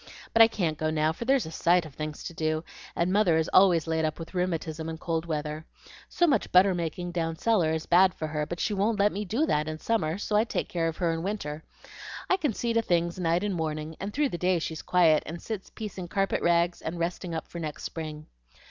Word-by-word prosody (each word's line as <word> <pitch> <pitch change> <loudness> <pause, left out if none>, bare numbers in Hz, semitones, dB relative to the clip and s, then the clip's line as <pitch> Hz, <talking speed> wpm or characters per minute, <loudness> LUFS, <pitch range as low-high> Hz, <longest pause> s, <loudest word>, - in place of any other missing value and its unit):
But 230 - +6
I 225 - +10
can't 170 -9 -2
go 155 - 0
now, 155 0 +1
for 235 - -6
there's 265 0 +3
a 160 - -7
sight 175 +1 +2
of 155 - -11
things 155 +1 -6
to - - -6
do, 155 0 -1 0.3
and 175 +2 +1
mother 195 -6 +4
is 160 - 0
always 180 -4 +5
laid 160 -1 0
up 155 -1 -1
with 165 +1 -9
rheumatism 165 -3 -2
in 160 - -5
cold 165 0 -2
weather. 150 -1 -3 0.5
So 350 - +2
much 295 -5 +1
butter 185 +1 +6
making 175 +1 -3
down 165 -2 -2
cellar 180 -4 +2
is 160 0 -2
bad 180 0 +5
for 155 - -4
her; 150 -1 -2
but 175 - -5
she 215 - 0
won't 205 +2 +1
let 205 +1 +3
me 210 +2 -4
do 235 - +1
that 150 - 0
in 155 0 -4
summer, 165 -4 0
so 210 +1 -2
I 210 - +5
take 235 - -3
care 165 -2 0
of 165 - -4
her 170 -3 +1
in 165 - -3
winter. 165 -6 -4 0.7
I 375 - +5
can 300 -8 0
see 235 +2 -1
to 230 - +3
things 170 -3 0
night 170 +1 +1
and 205 -1 -1
morning, 155 -1 -3
and 200 +1 -4
through 290 +4 +1
the 175 - -5
day 180 0 +2
she's 160 -1 -4
quiet, 165 -4 +4
and 170 +2 -6
sits 215 -1 -6
piecing 195 -4 -7
carpet 195 +2 0
rags 170 0 +2
and 165 +2 -4
resting 170 0 -3
up 160 - -4
for 170 - -8
next 155 -3 -5
spring. 155 -2 -6
170 Hz, 245 wpm, -27 LUFS, 160-195 Hz, 0.7 s, I